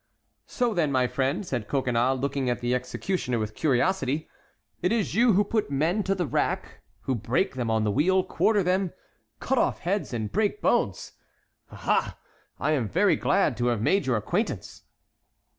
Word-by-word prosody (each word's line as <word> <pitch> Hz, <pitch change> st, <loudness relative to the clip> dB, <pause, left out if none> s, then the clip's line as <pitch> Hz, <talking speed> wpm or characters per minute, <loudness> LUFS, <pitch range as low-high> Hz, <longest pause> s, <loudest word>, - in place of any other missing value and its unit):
"So 245 Hz, -3 st, 0 dB
then, 160 Hz, -7 st, +1 dB
my 130 Hz, -2 st, +2 dB
friend," 140 Hz, +10 st, -1 dB
said 120 Hz, -, -3 dB
Coconnas, 130 Hz, -1 st, +1 dB
looking 140 Hz, -1 st, -1 dB
at 120 Hz, -, -1 dB
the 120 Hz, 0 st, -1 dB
executioner 125 Hz, +2 st, -2 dB
with 110 Hz, -1 st, -3 dB
curiosity, 155 Hz, -, 0 dB, 0.5 s
"it 180 Hz, -, +1 dB
is 225 Hz, -4 st, 0 dB
you 235 Hz, +3 st, +4 dB
who 200 Hz, +3 st, +4 dB
put 215 Hz, -2 st, -1 dB
men 160 Hz, +9 st, +1 dB
to 195 Hz, -, +1 dB
the 180 Hz, -2 st, -1 dB
rack, 135 Hz, -, -2 dB, 0.2 s
who 135 Hz, -, -1 dB
break 125 Hz, -, 0 dB
them 125 Hz, -3 st, -3 dB
on 110 Hz, -1 st, +1 dB
the 105 Hz, -, +1 dB
wheel, 185 Hz, -, +3 dB
quarter 210 Hz, +1 st, +1 dB
them, 185 Hz, 0 st, 0 dB, 0.5 s
cut 265 Hz, 0 st, 0 dB
off -, -, 0 dB
heads, 195 Hz, +4 st, -1 dB
and 110 Hz, -4 st, -3 dB
break 215 Hz, -, 0 dB
bones. -, -, 0 dB, 0.6 s
Aha! -, -, -1 dB, 0.4 s
I 155 Hz, -, 0 dB
am 130 Hz, -8 st, +1 dB
very -, -, +3 dB
glad -, -, +1 dB
to 120 Hz, -, 0 dB
have 115 Hz, -3 st, 0 dB
made 190 Hz, +1 st, +2 dB
your 125 Hz, -3 st, +2 dB
acquaintance." 140 Hz, -, -3 dB
140 Hz, 175 wpm, -26 LUFS, 125-190 Hz, 0.6 s, you